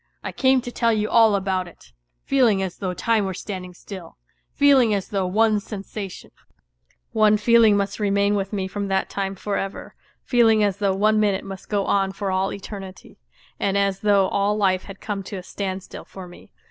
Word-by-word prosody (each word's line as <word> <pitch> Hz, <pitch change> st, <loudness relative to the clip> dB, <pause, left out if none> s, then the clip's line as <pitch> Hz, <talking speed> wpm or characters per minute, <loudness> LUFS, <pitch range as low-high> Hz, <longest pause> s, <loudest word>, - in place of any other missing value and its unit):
I -, -, -4 dB
came 260 Hz, -1 st, +3 dB
to 245 Hz, 0 st, -7 dB
tell 235 Hz, -1 st, +1 dB
you 215 Hz, -1 st, -1 dB
all 225 Hz, -3 st, +5 dB
about 190 Hz, -2 st, -1 dB
it, 110 Hz, -, -17 dB, 0.3 s
feeling 235 Hz, -8 st, +3 dB
as 185 Hz, -2 st, -5 dB
though 185 Hz, -2 st, -3 dB
time 225 Hz, 0 st, +1 dB
were 190 Hz, -2 st, -3 dB
standing 180 Hz, -3 st, -7 dB
still, 185 Hz, -3 st, -10 dB, 0.3 s
feeling 265 Hz, -6 st, +4 dB
as 195 Hz, -1 st, -4 dB
though 195 Hz, -3 st, -1 dB
one 215 Hz, +2 st, +2 dB
sensation, 200 Hz, -2 st, -8 dB, 0.8 s
one 215 Hz, -1 st, +4 dB
feeling 220 Hz, -1 st, +5 dB
must 200 Hz, +2 st, -2 dB
remain 200 Hz, 0 st, +2 dB
with 195 Hz, -1 st, -2 dB
me 195 Hz, -3 st, -2 dB
from 200 Hz, +1 st, -4 dB
that 190 Hz, 0 st, -1 dB
time 195 Hz, -1 st, -3 dB
for 200 Hz, +1 st, -3 dB
ever; 195 Hz, 0 st, -5 dB, 0.3 s
feeling 225 Hz, -3 st, +4 dB
as 200 Hz, -2 st, 0 dB
though 200 Hz, -2 st, 0 dB
one 215 Hz, +2 st, +3 dB
minute 200 Hz, -2 st, +1 dB
must 195 Hz, -1 st, -9 dB
go 205 Hz, -2 st, 0 dB
on 195 Hz, -1 st, +1 dB
for 195 Hz, 0 st, -3 dB
all 190 Hz, +1 st, 0 dB
eternity, 195 Hz, -, -9 dB, 0.4 s
and 200 Hz, 0 st, 0 dB
as 200 Hz, -1 st, +1 dB
though 200 Hz, -2 st, +3 dB
all 200 Hz, +1 st, +1 dB
life 185 Hz, -3 st, +1 dB
had 195 Hz, -1 st, -11 dB
come 205 Hz, -2 st, -3 dB
to 195 Hz, -, -8 dB
a 185 Hz, -, -7 dB
standstill 190 Hz, 0 st, -6 dB
for 190 Hz, -2 st, -10 dB
me. 175 Hz, -, -15 dB
200 Hz, 195 wpm, -23 LUFS, 190-215 Hz, 0.8 s, all